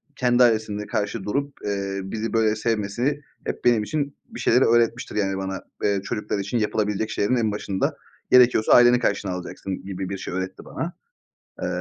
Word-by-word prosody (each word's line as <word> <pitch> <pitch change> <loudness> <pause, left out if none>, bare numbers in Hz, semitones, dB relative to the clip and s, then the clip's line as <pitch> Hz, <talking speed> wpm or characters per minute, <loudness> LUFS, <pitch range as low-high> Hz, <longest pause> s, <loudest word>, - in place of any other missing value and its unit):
kendi 125 -1 +4
ailesinde 110 -3 +1
karşı 100 -2 -2
durup, 140 +7 -2
eee, 100 -1 -2
bizi 110 +4 -4
böyle 110 -1 +3
sevmesi, 115 +6 -1 0.2
hep - - -4
benim 120 -3 +4
için 140 +4 -2
bir - - -9
şeyleri 125 +3 +4
öğretmiştir. 120 +1 +2
Yani, 95 -2 0
bana, 95 0 -4 0.2
eee, 100 -1 +2
çocuklar 105 0 -3
için 100 +5 -2
yapılabilecek 105 -1 0
şeylerin 105 +5 +1
en 115 -3 +1
başında 100 -2 -2 0.3
gerekiyorsa 125 -3 +6
aileni 120 0 +7
karşına 100 -5 0
alacaksın 90 +1 -6
gibi 95 -1 -4
bir 100 - -3
şey 95 - -6
öğretti 95 0 -4
bana. 170 +2 -4 0.7
Eee, - - -1
105 Hz, 170 wpm, -24 LUFS, 100-120 Hz, 0.7 s, aileni